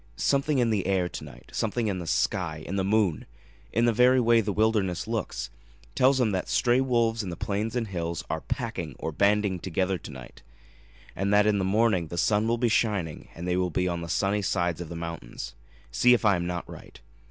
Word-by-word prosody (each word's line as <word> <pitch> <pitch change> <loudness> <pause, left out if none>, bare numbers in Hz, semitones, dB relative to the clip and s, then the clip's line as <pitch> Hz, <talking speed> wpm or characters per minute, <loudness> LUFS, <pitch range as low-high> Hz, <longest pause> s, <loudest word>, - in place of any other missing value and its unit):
Something 140 - +1
in 120 -3 +2
the 100 -4 0
air 95 -2 +1
to - - -7
night, - - -13
something 115 +1 -1
in 100 -3 -1
the 85 - -6
sky 80 -3 -1
in 95 - -4
the 95 - 0
moon 100 -4 +1 0.4
in 115 - +2
the 120 - +3
very 125 +3 +5
way 115 -1 +4
the 105 -1 -2
wilderness 105 -3 +1
looks, 75 - -3 0.4
tells 130 +1 +4
him 115 -4 +2
that 95 -2 -2
stray 125 +1 +3
wolves 115 -3 +1
in 100 - -5
the 85 - -5
plains 105 +6 -2
and 120 -2 -1
hills 85 -3 -3
are 80 - -3
'packing' - - -4
or 80 - -4
banding 100 +2 +2
together 95 +1 -1
to - - -10
night, 65 -3 -11 0.7
and 100 +1 -1
that 105 0 +5
in 105 -1 +2
the - - 0
morning 95 -3 +2
the 85 - -7
sun 105 +5 +2
will 115 +1 +1
be 120 0 +1
shining, 105 -8 0
and 85 +2 -6
they 90 - +1
will 90 -1 +1
be 90 +2 0
on 85 -1 -2
the 85 - -6
sunny 100 +5 +1
sides 90 -3 -1
of 85 - -7
the 85 - -6
mountains. 85 -7 -6 0.4
See 125 - +5
if 115 - -2
I 100 -2 +5
am 85 0 -2
not 90 -1 -4
right. - - -12
100 Hz, 220 wpm, -27 LUFS, 85-115 Hz, 0.7 s, very